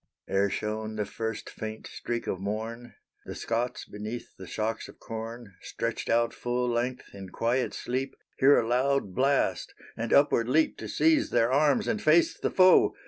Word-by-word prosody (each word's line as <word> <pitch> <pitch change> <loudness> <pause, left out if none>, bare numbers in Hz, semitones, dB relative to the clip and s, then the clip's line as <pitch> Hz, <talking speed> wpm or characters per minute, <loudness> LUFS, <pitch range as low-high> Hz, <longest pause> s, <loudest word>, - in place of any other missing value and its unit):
Ere 100 +1 +2
shone 110 +1 -3
the 105 -1 -1
first 110 +2 -5
faint 110 0 -7
streak 120 -1 -4
of 95 - -3
morn, 110 +4 -5 0.3
The - - -6
Scots 120 +2 -2
beneath 105 +3 -7
the 95 - -10
shocks 110 +1 -3
of - - -14
corn, 115 -1 -7
Stretched - - -4
out 115 0 +2
full 125 0 -2
length 120 +1 -2
in 95 -1 -9
quiet 120 +6 0
sleep, 130 +2 -3 0.2
Hear 140 +2 +6
a 115 - -1
loud 130 -3 +1
blast, 135 +4 +1 0.2
and 115 0 -4
upward 125 -4 +4
leap 155 +4 +3
To - - -6
seize 320 -1 +2
their 115 +2 +2
arms 150 - +3
and 215 -2 -1
face 160 +2 +4
the - - -2
foe. 185 -1 +5
120 Hz, 170 wpm, -28 LUFS, 110-130 Hz, 0.3 s, Hear